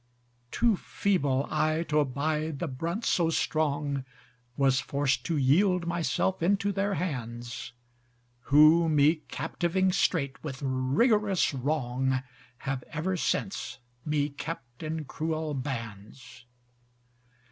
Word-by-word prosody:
Too 225 Hz, -, +2 dB
feeble 145 Hz, -12 st, 0 dB
I 155 Hz, +1 st, +1 dB
t'abide 150 Hz, +1 st, 0 dB
the 170 Hz, -, -3 dB
brunt 165 Hz, -, -3 dB
so 170 Hz, -2 st, +2 dB
strong, 145 Hz, -4 st, 0 dB, 0.5 s
Was 135 Hz, -2 st, +3 dB
forced 140 Hz, +2 st, 0 dB
to 165 Hz, -, 0 dB
yield 175 Hz, +7 st, +3 dB
myself 170 Hz, +2 st, 0 dB
into 200 Hz, +3 st, +2 dB
their 200 Hz, +1 st, 0 dB
hands: 120 Hz, -8 st, -4 dB, 0.7 s
Who 155 Hz, +3 st, +6 dB
me 150 Hz, +1 st, +4 dB
captiving 175 Hz, +6 st, 0 dB
straight 145 Hz, -7 st, 0 dB
with 135 Hz, -4 st, -5 dB
rigorous 185 Hz, -, +2 dB
wrong, 130 Hz, -1 st, -1 dB, 0.4 s
Have 135 Hz, -1 st, -2 dB
ever 165 Hz, +5 st, -2 dB
since 180 Hz, -6 st, -2 dB, 0.3 s
me 150 Hz, -1 st, 0 dB
kept 140 Hz, -4 st, -7 dB
in 160 Hz, -1 st, -3 dB
cruel 155 Hz, +1 st, -3 dB
bands. 120 Hz, -1 st, -7 dB
150 Hz, 105 wpm, -28 LUFS, 135-170 Hz, 0.7 s, Who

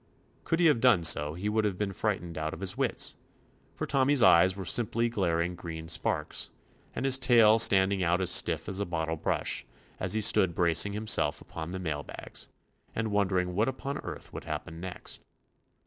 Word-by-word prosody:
Could 165 Hz, -, -1 dB
he 175 Hz, -, +3 dB
have 150 Hz, -8 st, +3 dB
done 120 Hz, -9 st, +4 dB
so 75 Hz, -1 st, +4 dB
he 95 Hz, +4 st, -5 dB
would 110 Hz, +1 st, 0 dB
have 100 Hz, -3 st, -2 dB
been 100 Hz, -1 st, -3 dB
frightened 90 Hz, -5 st, -3 dB
out 80 Hz, -, -4 dB
out -, -, -5 dB
of 80 Hz, -, -13 dB
his 95 Hz, -1 st, +2 dB
wits, -, -, -1 dB, 0.6 s
for -, -, -4 dB
Tommy's 135 Hz, -2 st, +2 dB
eyes 90 Hz, +3 st, +5 dB
were 95 Hz, -1 st, -7 dB
simply 115 Hz, +5 st, +1 dB
glaring 90 Hz, -5 st, -1 dB
green 85 Hz, -2 st, -8 dB
sparks, 85 Hz, -, -1 dB, 0.5 s
and -, -, -3 dB
his 135 Hz, -1 st, +3 dB
tail 115 Hz, -4 st, +4 dB
standing 95 Hz, -2 st, +5 dB
out 90 Hz, +1 st, +1 dB
as 90 Hz, -1 st, +2 dB
stiff -, -, +3 dB
as 95 Hz, +1 st, -5 dB
a 100 Hz, -, -2 dB
bottle 80 Hz, -1 st, -3 dB
brush, 75 Hz, -, -2 dB, 0.4 s
as 90 Hz, +2 st, +1 dB
he 110 Hz, -, 0 dB
stood 95 Hz, -5 st, +3 dB
bracing 85 Hz, +3 st, +3 dB
himself 105 Hz, -9 st, +1 dB
upon 80 Hz, 0 st, -8 dB
the 95 Hz, -, -5 dB
mail 80 Hz, -5 st, -4 dB
bags, -, -, -8 dB, 0.5 s
and 110 Hz, 0 st, -2 dB
wondering 95 Hz, -3 st, -1 dB
what 110 Hz, +7 st, 0 dB
upon 135 Hz, +2 st, -6 dB
earth -, -, -9 dB
would -, -, -8 dB
happen 80 Hz, +1 st, -7 dB
next. 90 Hz, +1 st, -8 dB
95 Hz, 195 wpm, -28 LUFS, 85-110 Hz, 0.6 s, eyes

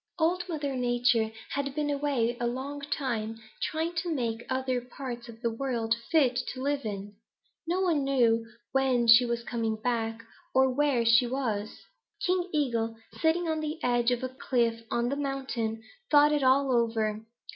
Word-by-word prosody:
"Old 355 Hz, +2 st, +1 dB
Mother 290 Hz, -5 st, -2 dB
Nature 245 Hz, -2 st, +2 dB, 0.2 s
had 275 Hz, -1 st, -2 dB
been 295 Hz, -1 st, 0 dB
away 275 Hz, -5 st, 0 dB
a 240 Hz, -, 0 dB
long 270 Hz, +4 st, -4 dB
time 230 Hz, -6 st, -3 dB, 0.2 s
trying 325 Hz, +2 st, -1 dB
to 345 Hz, +1 st, -1 dB
make 235 Hz, -5 st, -2 dB
other 260 Hz, -1 st, 0 dB
parts 245 Hz, -1 st, -7 dB
of 225 Hz, 0 st, -12 dB
the 235 Hz, -, +1 dB
world 230 Hz, -2 st, -1 dB
fit 275 Hz, -7 st, +4 dB, 0.2 s
to 255 Hz, -, -6 dB
live 280 Hz, -2 st, -1 dB
in. 200 Hz, 0 st, -6 dB, 0.5 s
No 360 Hz, +3 st, +1 dB
one 330 Hz, -6 st, +2 dB
knew 240 Hz, -4 st, +3 dB, 0.3 s
when 260 Hz, -3 st, +2 dB
she 230 Hz, +2 st, +8 dB
was 235 Hz, 0 st, -2 dB
coming 225 Hz, -2 st, -1 dB
back 225 Hz, -1 st, -2 dB, 0.3 s
or 265 Hz, 0 st, +5 dB
just 255 Hz, -, -4 dB
where 275 Hz, -6 st, +3 dB
she 230 Hz, +2 st, +5 dB
was. 225 Hz, -5 st, -3 dB, 0.4 s
King 365 Hz, 0 st, +1 dB
Eagle, 235 Hz, -7 st, 0 dB, 0.2 s
sitting 330 Hz, +2 st, +2 dB
on 315 Hz, -1 st, 0 dB
the 310 Hz, +1 st, -3 dB
edge 240 Hz, -1 st, +2 dB
of 245 Hz, 0 st, 0 dB
the 255 Hz, -, -2 dB
cliff 235 Hz, -3 st, 0 dB
on 235 Hz, 0 st, 0 dB
the 280 Hz, -, -1 dB
mountain, 265 Hz, -6 st, -3 dB, 0.3 s
thought 295 Hz, 0 st, +6 dB
it 295 Hz, -, +1 dB
all 265 Hz, +1 st, +4 dB
over. 220 Hz, -2 st, 0 dB
250 Hz, 170 wpm, -29 LUFS, 230-285 Hz, 0.5 s, she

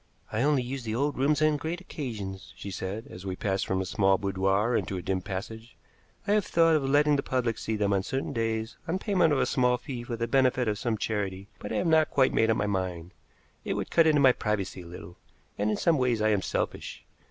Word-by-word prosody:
"I 110 Hz, -, -1 dB
only 140 Hz, -2 st, +2 dB
use 130 Hz, +2 st, -4 dB
the 110 Hz, -1 st, -3 dB
old 145 Hz, +4 st, 0 dB
rooms 145 Hz, +3 st, +2 dB
on 155 Hz, -1 st, +3 dB
great 160 Hz, +4 st, -4 dB
occasions," 105 Hz, -, -6 dB
she 100 Hz, -, -7 dB
said, 95 Hz, +4 st, -5 dB
as 90 Hz, -, -9 dB
we 95 Hz, -1 st, -3 dB
passed 95 Hz, 0 st, -1 dB
from 95 Hz, -, 0 dB
a -, -, -3 dB
small 95 Hz, +1 st, +2 dB
boudoir 95 Hz, +4 st, +1 dB
into 95 Hz, -, -1 dB
a -, -, -4 dB
dim 95 Hz, -1 st, -1 dB
passage. 110 Hz, +5 st, -7 dB, 0.5 s
"I -, -, +2 dB
have 210 Hz, -2 st, +2 dB
thought 165 Hz, -1 st, +4 dB
of 150 Hz, -, +1 dB
letting 145 Hz, +1 st, +4 dB
the -, -, 0 dB
public 120 Hz, -5 st, -1 dB
see 110 Hz, -, -2 dB
them 100 Hz, -1 st, +1 dB
on 95 Hz, -, +2 dB
certain 135 Hz, +7 st, -3 dB
days 115 Hz, -1 st, -2 dB
on 170 Hz, +3 st, 0 dB
payment 185 Hz, -5 st, +2 dB
of 145 Hz, -, +3 dB
a -, -, +2 dB
small 125 Hz, -1 st, +2 dB
fee 125 Hz, -2 st, -6 dB
for 120 Hz, 0 st, -4 dB
the 115 Hz, 0 st, -2 dB
benefit 130 Hz, 0 st, +2 dB
of 105 Hz, -1 st, -1 dB
some 115 Hz, -3 st, -1 dB
charity, 100 Hz, -2 st, -3 dB
but -, -, -7 dB
I -, -, -1 dB
have -, -, 0 dB
not 160 Hz, -2 st, +4 dB
quite 130 Hz, -2 st, +3 dB
made 115 Hz, -, +3 dB
up 110 Hz, -, +3 dB
my 105 Hz, -, 0 dB
mind. 90 Hz, -4 st, -3 dB, 0.5 s
It -, -, -2 dB
would -, -, -4 dB
cut 165 Hz, -1 st, +5 dB
into 150 Hz, -2 st, +4 dB
my 130 Hz, -2 st, +7 dB
privacy 100 Hz, -5 st, -2 dB
a 85 Hz, -, -11 dB
little, 85 Hz, 0 st, -10 dB, 0.4 s
and 105 Hz, +1 st, 0 dB
in 105 Hz, -, 0 dB
some 165 Hz, -4 st, +2 dB
ways 125 Hz, -3 st, +1 dB
I 110 Hz, 0 st, +2 dB
am 105 Hz, -3 st, +2 dB
selfish. -, -, -3 dB
115 Hz, 245 wpm, -28 LUFS, 100-140 Hz, 0.5 s, my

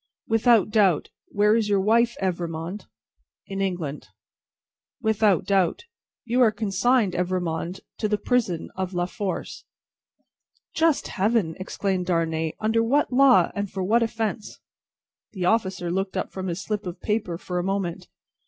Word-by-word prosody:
"Without 225 Hz, -2 st, +4 dB
doubt. 195 Hz, -7 st, +3 dB, 0.2 s
Where 210 Hz, +1 st, +3 dB
is 220 Hz, -2 st, +1 dB
your 200 Hz, -1 st, +3 dB
wife, 230 Hz, +4 st, +3 dB
Evrémonde?" 175 Hz, +1 st, -3 dB, 0.6 s
"In 195 Hz, 0 st, -4 dB
England." 175 Hz, -7 st, -3 dB, 0.9 s
"Without 215 Hz, -5 st, +2 dB
doubt. 190 Hz, -, +1 dB, 0.4 s
You 240 Hz, +2 st, +1 dB
are 230 Hz, -3 st, +6 dB
consigned, 210 Hz, +1 st, +1 dB
Evrémonde, 180 Hz, 0 st, -2 dB, 0.2 s
to 215 Hz, -, +1 dB
the 210 Hz, 0 st, +1 dB
prison 215 Hz, -9 st, -1 dB
of 190 Hz, -1 st, -4 dB
La 175 Hz, 0 st, +1 dB
Force." 190 Hz, +1 st, -5 dB, 1.1 s
"Just 320 Hz, -2 st, +2 dB
Heaven!" 200 Hz, -5 st, +1 dB
exclaimed 185 Hz, -1 st, -2 dB
Darnay. 160 Hz, -2 st, 0 dB
"Under 220 Hz, +1 st, +2 dB
what 260 Hz, +4 st, +1 dB
law, 270 Hz, 0 st, +5 dB
and 200 Hz, -1 st, -3 dB
for 190 Hz, 0 st, -4 dB
what 225 Hz, +6 st, +3 dB
offence?" 220 Hz, -1 st, -3 dB, 0.7 s
The 185 Hz, -4 st, -3 dB
officer 190 Hz, -4 st, 0 dB
looked 190 Hz, +1 st, -2 dB
up -, -, -3 dB
from 190 Hz, 0 st, -5 dB
his 175 Hz, +2 st, -3 dB
slip 210 Hz, -2 st, -3 dB
of 175 Hz, +1 st, -6 dB
paper 210 Hz, -6 st, -2 dB
for 180 Hz, 0 st, -4 dB
a -, -, -1 dB
moment. 185 Hz, -2 st, -2 dB
195 Hz, 145 wpm, -24 LUFS, 180-220 Hz, 1.1 s, are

